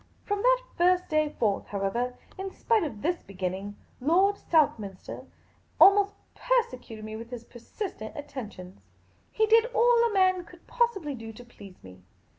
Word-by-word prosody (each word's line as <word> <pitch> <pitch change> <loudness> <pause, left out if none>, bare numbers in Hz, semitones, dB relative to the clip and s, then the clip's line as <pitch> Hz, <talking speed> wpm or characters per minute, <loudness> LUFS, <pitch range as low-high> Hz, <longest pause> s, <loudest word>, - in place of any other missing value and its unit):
From 410 -1 -2
that - - +3 0.2
first 360 +1 +3
day 310 -1 +2
forth, 210 -8 -1
however, 235 +5 -2 0.2
in 385 0 -5
spite 440 +1 +1
of 225 -10 -6
this 345 +3 0
begin 185 -2 -4
ning, 200 +2 -7 0.2
Lord 365 +9 +3
Southminster 220 - -1 0.5
almost 400 0 +6 0.2
persecuted 255 - -1
me 215 0 -6
with 230 +1 -8
his 245 -2 -7
per 240 - -14
sistent 235 - -7
attentions. 220 -10 -8 0.5
He 440 - +2
did 450 +2 +5
all 475 0 +4
a - - -5
man 370 -2 +3
could 345 0 -17
possibly 465 - 0
do 225 -3 -8
to 245 +3 -12
please 200 -6 -15
me. 95 0 -13
300 Hz, 160 wpm, -27 LUFS, -, 0.5 s, almost